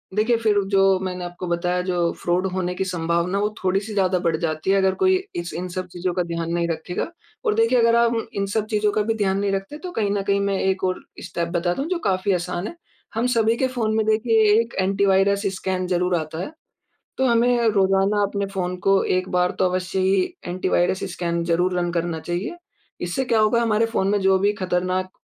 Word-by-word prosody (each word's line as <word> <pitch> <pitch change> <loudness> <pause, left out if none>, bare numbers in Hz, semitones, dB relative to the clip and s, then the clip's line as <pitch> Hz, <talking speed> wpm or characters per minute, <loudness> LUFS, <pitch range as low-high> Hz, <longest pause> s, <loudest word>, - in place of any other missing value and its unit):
देखिए, 220 +3 +3
फिर 220 -2 +1 0.2
जो 195 -1 +4
मैंने 180 -1 -4
आपको 175 +1 -6
बताया 175 +1 0
जो 175 -2 0
फ्रॉड 175 +2 +1
होने 180 -1 -2
की 190 - -1
संभावना 170 +1 -1
वो 210 +1 +1
थोड़ी-सी 195 +3 0
ज़्यादा 185 -2 +2
बढ़ 165 -1 +2
जाती 160 +1 -2
है 195 - +4
अगर 190 -1 +3
कोई 375 0 +3 0.2
इस 175 0 -4
इन 180 +2 -4
सब 185 0 -4
चीज़ों 180 0 -2
का 180 0 0
ध्यान 170 -1 -3
नहीं 170 0 0
रखेगा। 165 +2 -3 0.4
और 435 - +3
देखिए 455 - +3
अगर 230 0 +4
आप 235 0 +3 0.2
इन 200 - -1
सब 210 +2 -1
चीज़ों 210 -1 +2
का 215 - +1
भी 225 +2 0
ध्यान 195 -2 +1
नहीं 200 0 0
रखते 195 +9 -3
तो 360 +3 -7
कहीं 210 -10 -1
न 200 0 0
कहीं 200 0 +2
मैं 200 -1 0
एक 190 0 0
और 185 -1 -1 0.2
स्टेप 170 -1 -3
बता 175 0 +1
दूँ 275 - -3
जो 365 -2 -1
काफ़ी 195 - 0
आसान 180 +2 -2
है। - - -8 0.4
हम 230 +2 0
सभी 230 -2 +2
के 260 - +1
फ़ोन 230 -4 -1
में 220 -1 +1
देखिए 220 +1 +3 0.2
एक 230 0 -2
एंटी 195 +1 +1
वायरस 195 +1 +3
स्कैन 185 -1 -2
ज़रूर 180 0 +1
आता 160 -1 -3
है। 185 - -4 0.7
तो 265 - +3
हमें 235 0 +3
रोज़ाना 195 0 +2
अपने 200 0 -1
फ़ोन 180 -1 -2
को 195 0 +4 0.2
एक 185 0 -4
बार 180 0 +1
तो - - +3
अवश्य 185 +1 -2
ही 190 0 +3 0.2
एंटी 185 +1 -2
वायरस 185 +1 +1
स्कैन 170 -1 -2
ज़रूर 175 +2 +1
रन 175 0 0
करना 170 -1 -1
चाहिए। 175 - -4 0.4
इससे 175 +10 -2
क्या 230 -3 +2
होगा 215 +2 +3
हमारे 225 0 +2
फ़ोन 195 -4 0
में 205 +1 +2
जो 190 0 +4
भी 200 +2 +2
ख़तरनाक 185 +1 -1
190 Hz, 220 wpm, -22 LUFS, 180-215 Hz, 0.7 s, जो